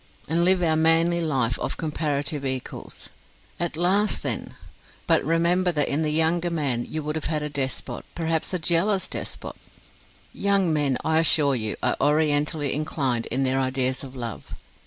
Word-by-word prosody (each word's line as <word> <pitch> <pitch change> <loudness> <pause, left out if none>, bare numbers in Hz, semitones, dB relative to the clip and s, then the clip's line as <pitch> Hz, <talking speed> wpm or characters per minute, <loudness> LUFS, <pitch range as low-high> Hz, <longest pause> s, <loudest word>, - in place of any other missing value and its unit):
and 165 +3 +1
live 185 0 +4
our 160 -2 +3
manly 165 +2 +3
life 130 -8 0
of - - -3
comparative 150 -2 -2
equals. 130 -2 -5 0.5
At 170 -3 -1
last, 195 +4 +2
then! - - -2 0.5
But - - +3
remember 170 +3 +2
that 145 -2 +1
in 145 +3 0
the 155 - +1
younger 165 +3 +2
man 140 -8 -1
you 155 -1 -4
would 150 +1 -3
have 160 - -3
had 155 -1 -1
a 150 - -4
despot 135 -2 -3
perhaps 165 -1 -1
a 185 - 0
jealous 180 +4 +1
despot. - - -6 0.8
Young 195 -4 +1
men, 145 -4 +1
I 160 0 +3
assure 150 -3 +4
you, 110 -4 -1
are - - +1
orientally 150 0 +2
inclined 135 -5 -1
in 130 +3 0
their 130 0 +1
ideas 130 0 0
of 135 -1 -9
love. 115 -4 -6
155 Hz, 165 wpm, -24 LUFS, 135-165 Hz, 0.8 s, live